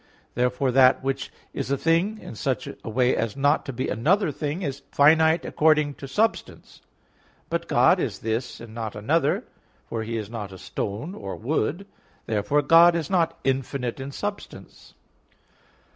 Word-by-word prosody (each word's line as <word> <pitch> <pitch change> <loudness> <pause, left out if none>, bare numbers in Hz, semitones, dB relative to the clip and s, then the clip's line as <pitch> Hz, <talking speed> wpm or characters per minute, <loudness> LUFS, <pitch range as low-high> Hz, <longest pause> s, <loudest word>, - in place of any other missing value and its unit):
Therefore 125 +2 0
that 130 0 +5
which 135 0 -2 0.2
is - - -4
a 140 - +1
thing 170 +9 +1
in 210 - -10
such 110 - -2
a - - -8
way 125 +3 +2
as 115 +2 -2
not 145 +2 +2
to - - -2
be 130 +1 -3
another 160 - +1
thing, 150 +6 -4
is 140 -2 -4
finite 160 +3 +4
according 150 -2 +2
to 135 - -6
substance. 215 +10 -2 0.7
But - - -2
God - - +4
is - - -2
this, 115 +3 -3
and 115 -1 -11
not 110 -2 -5
another; 140 +8 +1 0.4
for 115 - -4
He 115 +1 -3
is 105 -2 -4
not 105 -3 -6
a 95 - -10
stone 105 - -5
or 100 - -6
wood. 155 - -2 0.4
Therefore 115 +8 +1
God 170 +3 +7
is 170 +1 -3
not 170 -4 +1
infinite 135 -1 -2
in 135 +1 -6
substance. 205 +7 -7
135 Hz, 160 wpm, -25 LUFS, 115-160 Hz, 0.7 s, God